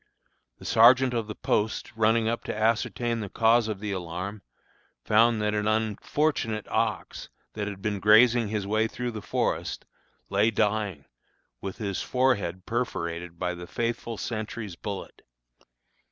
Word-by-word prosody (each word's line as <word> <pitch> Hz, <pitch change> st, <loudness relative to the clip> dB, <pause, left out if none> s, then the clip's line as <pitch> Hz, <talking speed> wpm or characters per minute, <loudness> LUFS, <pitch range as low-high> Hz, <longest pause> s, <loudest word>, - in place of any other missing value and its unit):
The -, -, -13 dB
sergeant 125 Hz, +3 st, +6 dB
of 115 Hz, -3 st, -1 dB
the 110 Hz, -, -6 dB
post, 110 Hz, +2 st, -1 dB
running 110 Hz, 0 st, +3 dB
up 115 Hz, +1 st, -1 dB
to -, -, -4 dB
ascertain 115 Hz, +1 st, 0 dB
the 105 Hz, -3 st, -5 dB
cause 115 Hz, +2 st, +3 dB
of 105 Hz, -3 st, -3 dB
the 105 Hz, 0 st, -4 dB
alarm, 95 Hz, +3 st, -5 dB, 0.6 s
found 115 Hz, +1 st, +4 dB
that 105 Hz, 0 st, +1 dB
an 105 Hz, 0 st, 0 dB
unfortunate 110 Hz, +2 st, 0 dB
ox, -, -, -2 dB, 0.2 s
that 105 Hz, -1 st, -3 dB
had 100 Hz, -1 st, -7 dB
been 105 Hz, -2 st, -1 dB
grazing 110 Hz, +3 st, +5 dB
his 105 Hz, -1 st, -2 dB
way 110 Hz, +2 st, +1 dB
through 125 Hz, +2 st, -4 dB
the 110 Hz, -2 st, -6 dB
forest, -, -, -2 dB, 0.4 s
lay 100 Hz, +3 st, +3 dB
dying, 105 Hz, -8 st, -1 dB, 0.6 s
with 95 Hz, -1 st, -5 dB
his 100 Hz, -3 st, -3 dB
forehead 100 Hz, -9 st, 0 dB
perforated 85 Hz, -8 st, -3 dB
by 90 Hz, +1 st, -2 dB
the 90 Hz, 0 st, -8 dB
faithful 115 Hz, +1 st, -3 dB
sentry's 110 Hz, -4 st, -5 dB
bullet. 100 Hz, +2 st, -7 dB
110 Hz, 145 wpm, -27 LUFS, 100-115 Hz, 0.6 s, sergeant